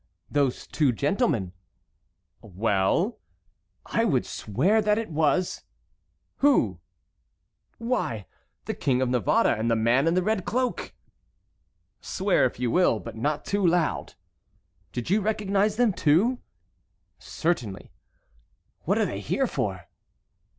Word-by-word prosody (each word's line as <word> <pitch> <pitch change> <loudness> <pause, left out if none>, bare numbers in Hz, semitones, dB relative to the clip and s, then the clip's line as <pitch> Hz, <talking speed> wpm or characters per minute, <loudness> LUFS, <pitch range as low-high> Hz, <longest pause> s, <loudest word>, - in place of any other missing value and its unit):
"Those 140 -3 0
two 145 -5 +1
gentlemen." 135 - 0 0.9
"Well?" 105 - 0 0.7
"I - - 0
would - - +1
swear 170 - +1
that 210 0 +2
it 225 -5 -3
was"— 160 +3 +1 0.8
"Who?" 120 - +3 1.0
"Why—the 230 - -4
King 130 -2 0
of 130 - -1
Navarre 125 -6 +2
and 110 +2 -1
the 115 - +3
man 120 +6 +2
in 165 - +2
the 185 - +2
red 215 -1 0
cloak." 250 +5 -2 1.1
"Swear 190 -5 +1
if 125 - -3
you 125 -2 0
will, 175 -10 +3
but - - -9
not 145 +6 -2
too 200 0 -1
loud." 170 -2 +1 0.8
"Did 120 +7 -4
you 210 +2 +3
recognize 205 0 0
them 235 -3 +2
too?" 185 - +2 0.8
"Certainly." 125 - -3 0.9
"What - - +2
are - - +2
they - - -4
here - - 0
for?" - - -3
160 Hz, 120 wpm, -26 LUFS, -, 1.1 s, Who